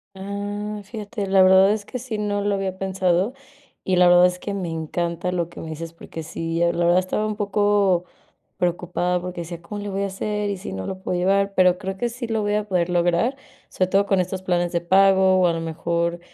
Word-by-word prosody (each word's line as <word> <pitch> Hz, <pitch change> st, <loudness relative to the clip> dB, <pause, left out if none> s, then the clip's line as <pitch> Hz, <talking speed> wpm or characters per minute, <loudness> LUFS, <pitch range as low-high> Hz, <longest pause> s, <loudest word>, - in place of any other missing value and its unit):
Ah, 205 Hz, +2 st, -5 dB
fíjate, 210 Hz, 0 st, -5 dB
la 195 Hz, 0 st, +4 dB
verdad 190 Hz, +1 st, +6 dB
es 210 Hz, -2 st, -4 dB
que 250 Hz, -, -5 dB
sí, 235 Hz, -3 st, -5 dB
no 205 Hz, -1 st, -1 dB
lo 205 Hz, 0 st, +1 dB
había 190 Hz, -1 st, -2 dB
pensado, 190 Hz, +3 st, 0 dB, 0.5 s
y 185 Hz, -, +1 dB
la 180 Hz, 0 st, +6 dB
verdad 175 Hz, 0 st, +7 dB
es 180 Hz, 0 st, 0 dB
que 200 Hz, -1 st, -4 dB
me 185 Hz, -3 st, -3 dB
encanta 170 Hz, +2 st, -2 dB
lo 170 Hz, -2 st, -2 dB
que -, -, -11 dB
me 160 Hz, -, -7 dB
dices, 165 Hz, +1 st, -6 dB
porque 165 Hz, -1 st, -9 dB
sí, 165 Hz, +1 st, -2 dB
eh, 170 Hz, 0 st, +2 dB
la 170 Hz, 0 st, 0 dB
verdad 175 Hz, +1 st, +4 dB
estaba 210 Hz, +3 st, -1 dB
un 215 Hz, -, -3 dB
poco 205 Hz, -3 st, +2 dB, 0.5 s
preocupada 180 Hz, 0 st, -1 dB
porque 180 Hz, -1 st, -5 dB
decía: 170 Hz, 0 st, -7 dB
"¿Cómo 205 Hz, +5 st, -7 dB
le 205 Hz, -, -4 dB
voy 195 Hz, 0 st, -2 dB
a 200 Hz, -, 0 dB
hacer? 210 Hz, +2 st, -3 dB
¿Y 200 Hz, -, -2 dB
si 180 Hz, -, -7 dB
no 95 Hz, 0 st, -5 dB
lo 190 Hz, 0 st, -5 dB
puedo 180 Hz, -, -1 dB
llevar?", 195 Hz, +2 st, +1 dB
pero 180 Hz, -1 st, +4 dB
creo 190 Hz, +1 st, -5 dB
que 240 Hz, +4 st, -1 dB
sí 240 Hz, +1 st, -6 dB
lo 225 Hz, -1 st, -1 dB
voy 205 Hz, 0 st, 0 dB
a 210 Hz, 0 st, -1 dB
poder 180 Hz, -2 st, 0 dB
lograr, 175 Hz, +8 st, +1 dB, 0.3 s
sobre 185 Hz, -, 0 dB
todo 200 Hz, +1 st, +3 dB
con 195 Hz, -2 st, +2 dB
estos 185 Hz, +1 st, -2 dB
planes 175 Hz, -2 st, 0 dB
de 170 Hz, -1 st, 0 dB
pago, 190 Hz, +1 st, +4 dB
o 180 Hz, -, +4 dB
a 170 Hz, -, +3 dB
lo 165 Hz, -, -3 dB
mejor, 170 Hz, +1 st, -2 dB
185 Hz, 235 wpm, -23 LUFS, 175-205 Hz, 0.5 s, verdad